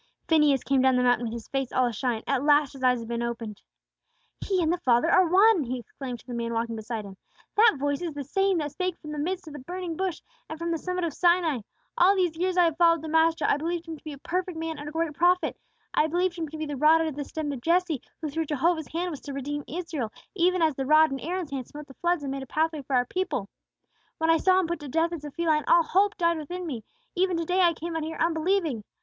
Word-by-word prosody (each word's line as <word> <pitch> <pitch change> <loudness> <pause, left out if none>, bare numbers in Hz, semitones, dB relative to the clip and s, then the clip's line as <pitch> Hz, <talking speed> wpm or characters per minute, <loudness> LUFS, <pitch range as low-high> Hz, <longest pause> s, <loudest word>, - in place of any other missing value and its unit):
Phineas 300 -5 +4
came 275 -1 +2
down 260 0 +4
the 250 - +2
mountain 245 -1 +2
with 225 - -5
his 235 -1 -7
face 270 -2 -2
all 255 - +2
ashine; 235 -1 -2
at 275 -1 0
last 290 -1 +4
his 270 - -11
eyes 250 -1 +4
had 230 -1 -7
been 235 0 -2
opened. 230 -3 -5 0.8
"He 385 -2 0
and 320 +1 +2
the 355 - -2
Father 250 +5 +3
are 370 -1 +5
one!" 390 -1 +5
he 255 +2 -3
exclaimed 245 0 -7
to - - -27
the 250 - -7
man 235 -1 -3
walking 230 0 -1
beside 220 0 -5
him. 195 -1 -11 0.4
"That 430 -4 +5
voice 285 +2 -1
is 335 -4 -4
the 285 - -4
same 390 +6 +1
that 295 -2 -2
spake 365 +1 -2
from 300 - -9
the 300 - -4
midst 360 +5 -2
of 310 - -10
the 295 - -7
burning 350 +4 -5
bush, 370 -2 -3 0.3
and 315 - -5
from 335 +1 -3
the 330 - -1
summit 365 +1 -3
of 330 -3 -1
Sinai. 345 -5 +2 0.4
All 375 +3 +6
these 355 -4 +1
years 365 +2 -1
I 355 - +6
have 325 -2 +1
followed 335 -2 +4
the 320 - -5
Master, 320 -1 +3
I - - +3
believed 335 +2 -3
Him 325 - -5
to 300 - -17
be 310 - -6
a - - -9
perfect 360 +3 -3
man 320 -1 -4
and 290 0 -6
a - - -9
great 325 -1 -1
prophet; 355 +4 +2 0.4
I 310 - +3
believed 350 +2 0
Him 325 -3 -4
to 315 - -8
be 310 - -3
'the 290 -2 -5
rod 310 +4 +5
out - - +1
of 295 - -8
the 290 - -3
stem 300 +1 -4
of 265 -4 -6
Jesse' 335 -2 +1 0.2
who 310 - -1
through 325 +2 -1
Jehovah's 315 +2 0
hand 350 +2 -3
was 295 - -7
to 285 - -7
redeem 290 +2 -4
Israel, 315 -9 -4 0.2
even 365 -2 +2
as 315 -2 +3
the 270 0 -4
rod 310 +1 +6
in 270 - -3
Aaron's 350 -1 -4
hand 265 -3 -4
smote 295 0 -10
the 275 - -14
floods 345 +1 0
and 275 - -3
made 275 0 -4
a 265 - -8
pathway 315 +2 0
for 270 0 -2
our 245 0 +3
people. 360 - -3 0.7
"When 320 0 +2
I 325 - +5
saw 370 +3 +4
Him 375 - +1
put 340 0 -3
to 295 - -8
death 325 +5 0
as 320 -3 -6
a - - -5
felon, 310 0 +1
all 340 - +6
hope 400 +5 +2
died 335 -2 +1
within 355 +4 -6
me; 250 -9 -5 0.3
even 365 -1 +1
to 335 - -2
day 365 +3 +1
I 340 -2 +4
came 335 +1 -5
out 325 - -1
here 320 +1 -5
unbelieving. 325 - 0
315 Hz, 275 wpm, -26 LUFS, 275-345 Hz, 0.8 s, All